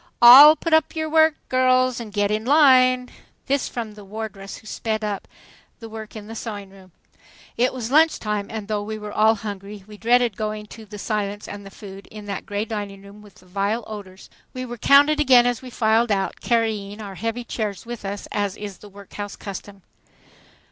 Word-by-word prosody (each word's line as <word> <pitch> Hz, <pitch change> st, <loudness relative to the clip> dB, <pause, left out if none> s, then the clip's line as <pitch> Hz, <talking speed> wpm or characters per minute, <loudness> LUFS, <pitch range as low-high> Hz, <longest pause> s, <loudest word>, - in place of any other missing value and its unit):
." -, -, -44 dB
"All 275 Hz, +6 st, +10 dB
put 330 Hz, 0 st, -3 dB
up 315 Hz, +1 st, +3 dB
your 315 Hz, 0 st, -2 dB
work, 315 Hz, 0 st, +4 dB
girls, 255 Hz, -1 st, +2 dB
and 225 Hz, -3 st, -8 dB
get 205 Hz, 0 st, 0 dB
in 215 Hz, +1 st, -1 dB
line." 255 Hz, -2 st, +4 dB, 0.3 s
This 275 Hz, -1 st, 0 dB
from 225 Hz, -3 st, -5 dB
the 210 Hz, -1 st, -13 dB
wardress, 205 Hz, -1 st, -7 dB
who -, -, -17 dB
sped 220 Hz, 0 st, -3 dB
up 205 Hz, -2 st, -4 dB, 0.5 s
the 225 Hz, -, -9 dB
work 220 Hz, 0 st, -9 dB
in 215 Hz, -1 st, -8 dB
the 225 Hz, -, -9 dB
sewing 205 Hz, -4 st, -7 dB
room. 190 Hz, -1 st, -17 dB, 0.6 s
It 245 Hz, +2 st, +2 dB
was 245 Hz, -2 st, -5 dB
lunch 315 Hz, +3 st, +4 dB
time, 210 Hz, -2 st, -3 dB
and 220 Hz, -2 st, -6 dB
though 210 Hz, -1 st, -1 dB
we 215 Hz, +1 st, -5 dB
were 210 Hz, -1 st, -7 dB
all 220 Hz, +2 st, +3 dB
hungry 200 Hz, -1 st, -8 dB
we 210 Hz, 0 st, -13 dB
dreaded 240 Hz, 0 st, +2 dB
going 215 Hz, -1 st, -4 dB
to 225 Hz, -, -12 dB
the 210 Hz, +1 st, -9 dB
silence 205 Hz, -1 st, -3 dB
and 205 Hz, 0 st, -8 dB
the -, -, -9 dB
food 195 Hz, -1 st, -12 dB
in 210 Hz, -1 st, -11 dB
that 200 Hz, -2 st, -6 dB
gray 205 Hz, +1 st, -2 dB
dining 205 Hz, -3 st, -6 dB
room 200 Hz, +1 st, -14 dB
with 205 Hz, -2 st, -17 dB
the 185 Hz, -, -20 dB
vile 200 Hz, +5 st, -2 dB
odors. 195 Hz, -3 st, -10 dB, 0.2 s
We 255 Hz, 0 st, -4 dB
were 240 Hz, -1 st, -8 dB
counted 285 Hz, +4 st, +5 dB
again 255 Hz, -4 st, +6 dB
as 245 Hz, -2 st, 0 dB
we 260 Hz, -, -9 dB
filed 225 Hz, -1 st, +2 dB
out, 195 Hz, -1 st, -1 dB
carrying 220 Hz, -3 st, -1 dB
our 200 Hz, -2 st, -7 dB
heavy 230 Hz, +5 st, -4 dB
chairs 210 Hz, -5 st, -4 dB
with 240 Hz, -2 st, -7 dB
us 200 Hz, +1 st, -5 dB
as 205 Hz, -1 st, -2 dB
is 205 Hz, -3 st, -8 dB
the 210 Hz, -, -13 dB
workhouse 200 Hz, +1 st, -9 dB
custom. 200 Hz, -1 st, -9 dB
215 Hz, 205 wpm, -22 LUFS, 205-240 Hz, 0.6 s, All